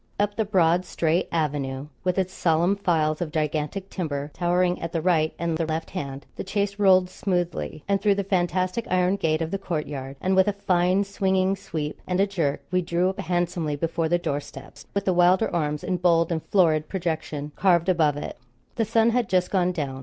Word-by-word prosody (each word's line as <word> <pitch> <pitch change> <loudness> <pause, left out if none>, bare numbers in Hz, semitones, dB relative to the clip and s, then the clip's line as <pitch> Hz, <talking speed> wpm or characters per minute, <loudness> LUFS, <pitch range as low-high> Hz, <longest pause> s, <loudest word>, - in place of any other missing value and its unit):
Up 205 0 +1
the 220 - 0
broad 180 -3 +3
straight 170 -1 0
avenue 145 -4 -1 0.2
with 180 0 0
its 185 -1 0
solemn 170 +3 +2
files 160 -5 0
of 165 -3 -2
gigantic 155 +4 -2
timber 150 -5 -3
towering 180 0 +1
at 165 - -5
the 165 - +1
right 160 -2 +2
and 170 -1 -2
the 165 - +1
left 160 +1 -3
hand, 140 -6 -5
the - - -3
chaise 200 0 -1
rolled 185 -2 +5
smoothly, 175 -5 -3
and 200 0 +1
through 205 -2 +3
the 200 - -1
fantastic 185 +2 0
iron 185 +1 +2
gate 160 -4 0
of 160 - -5
the 195 - -2
courtyard, 145 -7 -4
and 190 +1 +1
with 190 +1 +4
a 205 - +2
fine 185 0 +2
swinging 190 -1 +1
sweep 160 -6 -5
and 180 0 0
a 195 - +5
jerk, 165 -8 -2
we 185 0 +2
drew 175 +1 +1
up 190 - -6
handsomely 175 -3 -1
before 165 +2 -1
the 175 - +3
door 160 -5 -2
steps, - - -12
with 200 -1 0
the 185 - +2
Wylder 180 +3 +3
arms 150 -3 -1
in 185 -1 -1
bold 170 -1 +3
and 160 -1 -1
florid 155 -5 +3
projection 160 -5 -3
carved 175 -2 +3
above 160 -6 +2
it. 145 - -6 0.4
The 225 - +2
sun 225 +1 +3
had 240 -2 0
just 180 -1 +1
gone 180 -2 +2
down. 140 -6 -4
175 Hz, 205 wpm, -25 LUFS, 160-190 Hz, 0.4 s, rolled